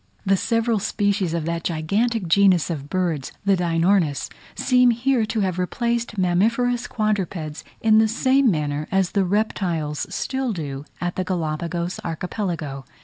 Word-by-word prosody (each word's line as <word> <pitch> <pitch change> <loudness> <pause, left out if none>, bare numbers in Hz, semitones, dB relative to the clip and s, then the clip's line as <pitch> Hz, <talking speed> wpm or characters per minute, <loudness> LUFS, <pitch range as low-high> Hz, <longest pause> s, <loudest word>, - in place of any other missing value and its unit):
The 195 0 +4
several 230 +2 +1
species 200 -2 0
of 165 -2 -2
that 170 0 -2
gigantic 195 +6 0
genus 180 -1 +4
of 145 -3 -5
birds, 170 -7 -1
the 200 -1 +4
Deinornis 170 -3 +1 0.2
seem 250 -1 +4
here 240 -1 +1
to 220 0 -1
have 185 -2 -1
replaced 235 +4 -1
mammiferous 230 +7 +1
quadrupeds, 190 -8 -2 0.2
in 220 -1 +5
the 220 - +4
same 260 +3 +3
manner 150 -4 -1
as 190 -2 +2
the 195 -2 +2
reptiles 175 -7 -1
still 265 -3 -2
do 145 -5 -5
at 175 0 -3
the 185 - 0
Galapagos 170 0 -2
archipelago. 165 -5 -4
185 Hz, 145 wpm, -23 LUFS, 165-220 Hz, 0.2 s, in